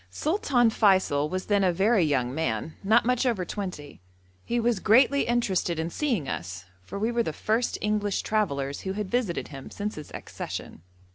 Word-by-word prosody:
Sultan 260 Hz, -, +1 dB
Feysul 185 Hz, -9 st, +3 dB
was 185 Hz, +2 st, -3 dB
then 205 Hz, -1 st, +2 dB
a 185 Hz, -, +4 dB
very 195 Hz, +3 st, +3 dB
young 130 Hz, -5 st, 0 dB
man, 140 Hz, -1 st, -2 dB
not 220 Hz, +4 st, +4 dB
much 250 Hz, +1 st, +2 dB
over 230 Hz, -8 st, 0 dB
twenty. 180 Hz, -, -6 dB, 0.4 s
He 240 Hz, -, -1 dB
was 235 Hz, -3 st, +1 dB
greatly 255 Hz, +7 st, +4 dB
interested 195 Hz, -8 st, 0 dB
in 160 Hz, +1 st, -2 dB
seeing 235 Hz, -, -1 dB
us, 90 Hz, -2 st, -5 dB, 0.2 s
for 90 Hz, -, -8 dB
we 220 Hz, +4 st, 0 dB
were 235 Hz, 0 st, +1 dB
the 225 Hz, -, -2 dB
first 225 Hz, +9 st, -1 dB
English 210 Hz, -1 st, 0 dB
travellers 140 Hz, -11 st, -1 dB
who 190 Hz, -, -3 dB
had 205 Hz, -1 st, -4 dB
visited 240 Hz, -8 st, -1 dB
him 135 Hz, -2 st, -9 dB
since 210 Hz, +1 st, -4 dB
his 150 Hz, -, -9 dB
accession. -, -, -7 dB
200 Hz, 180 wpm, -26 LUFS, 155-230 Hz, 0.4 s, a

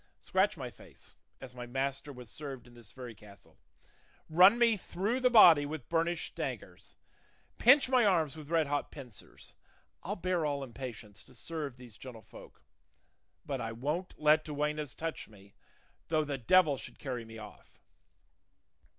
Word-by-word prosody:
Scratch -, -, +1 dB
my -, -, -6 dB
face, -, -, -16 dB, 0.3 s
as 130 Hz, -2 st, -10 dB
my 120 Hz, -1 st, -8 dB
master 135 Hz, +3 st, -3 dB
was 125 Hz, -3 st, -11 dB
served 140 Hz, -4 st, -7 dB
in 120 Hz, -, -17 dB
this 120 Hz, -3 st, -14 dB
very 125 Hz, -3 st, -9 dB
castle; 100 Hz, -1 st, -18 dB, 0.7 s
run 185 Hz, +7 st, +7 dB
me 235 Hz, -2 st, +4 dB
through 205 Hz, +5 st, -2 dB
the 255 Hz, -1 st, +4 dB
body 175 Hz, -11 st, +8 dB
with 145 Hz, -3 st, -6 dB
burnished 165 Hz, 0 st, -1 dB
daggers; -, -, -6 dB, 0.6 s
pinch 275 Hz, +4 st, +6 dB
my 255 Hz, -2 st, +4 dB
arms 165 Hz, -8 st, +2 dB
with 155 Hz, -2 st, -10 dB
red 165 Hz, -2 st, +2 dB
hot 145 Hz, 0 st, -2 dB
pincers; 125 Hz, -7 st, -12 dB, 0.5 s
I'll 200 Hz, +4 st, -4 dB
bear 180 Hz, -2 st, -1 dB
all 145 Hz, -2 st, -1 dB
in 125 Hz, -3 st, -10 dB
patience 115 Hz, -6 st, -8 dB
to 130 Hz, -, -17 dB
serve 145 Hz, +1 st, -5 dB
these 120 Hz, -4 st, -13 dB
gentlefolk; 125 Hz, -4 st, -12 dB, 0.8 s
but 135 Hz, -3 st, -3 dB
I 115 Hz, -1 st, -4 dB
won't 150 Hz, +10 st, -3 dB
let 155 Hz, +1 st, +4 dB
duennas 150 Hz, -1 st, -3 dB
touch 165 Hz, 0 st, -5 dB
me, 100 Hz, -2 st, -18 dB, 0.5 s
though 155 Hz, -1 st, +1 dB
the 140 Hz, -2 st, -4 dB
devil 150 Hz, +3 st, +4 dB
should -, -, -10 dB
carry 125 Hz, -4 st, -5 dB
me 115 Hz, 0 st, -11 dB
off!" 110 Hz, -1 st, -13 dB
145 Hz, 160 wpm, -32 LUFS, 125-165 Hz, 0.8 s, body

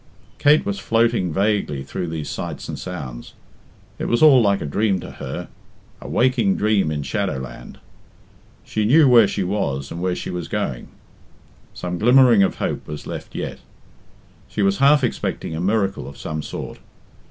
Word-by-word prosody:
Kate 150 Hz, +2 st, +4 dB
was 100 Hz, 0 st, -2 dB
floating 115 Hz, -3 st, +1 dB
vaguely 95 Hz, -7 st, 0 dB
through 85 Hz, -, -4 dB
these 80 Hz, -2 st, -5 dB
sights -, -, -5 dB
and -, -, -6 dB
sounds. 70 Hz, -10 st, -7 dB, 0.6 s
It -, -, -2 dB
was 120 Hz, +5 st, +2 dB
all 140 Hz, -5 st, +8 dB
like 100 Hz, -2 st, +2 dB
a -, -, -5 dB
dream 95 Hz, +6 st, 0 dB
to -, -, -8 dB
her -, -, -6 dB, 0.5 s
a -, -, -8 dB
waking 120 Hz, -6 st, +2 dB
dream 105 Hz, -5 st, +2 dB
in 75 Hz, -2 st, -3 dB
shadow 90 Hz, +2 st, -2 dB
land. 65 Hz, -2 st, -9 dB, 0.9 s
She 110 Hz, -, -2 dB
knew 140 Hz, +7 st, +5 dB
where 120 Hz, -4 st, +7 dB
she 100 Hz, -, -2 dB
was 70 Hz, -8 st, -2 dB
and 85 Hz, -, -5 dB
where 90 Hz, 0 st, 0 dB
she -, -, -5 dB
was 90 Hz, -2 st, -4 dB
going. 100 Hz, -, -3 dB, 0.9 s
Some 90 Hz, -1 st, -4 dB
glimmering 125 Hz, -1 st, +6 dB
of 95 Hz, -, +2 dB
hope -, -, -3 dB
was 75 Hz, 0 st, -7 dB
left -, -, -7 dB
yet. -, -, -5 dB, 0.9 s
She 105 Hz, -, -2 dB
was 100 Hz, 0 st, +2 dB
half 140 Hz, +1 st, +5 dB
expecting 115 Hz, -8 st, -2 dB
a 80 Hz, -, -3 dB
miracle 100 Hz, 0 st, 0 dB
of 70 Hz, -, -10 dB
some 80 Hz, 0 st, -4 dB
sort. -, -, -7 dB
100 Hz, 170 wpm, -21 LUFS, 80-115 Hz, 0.9 s, all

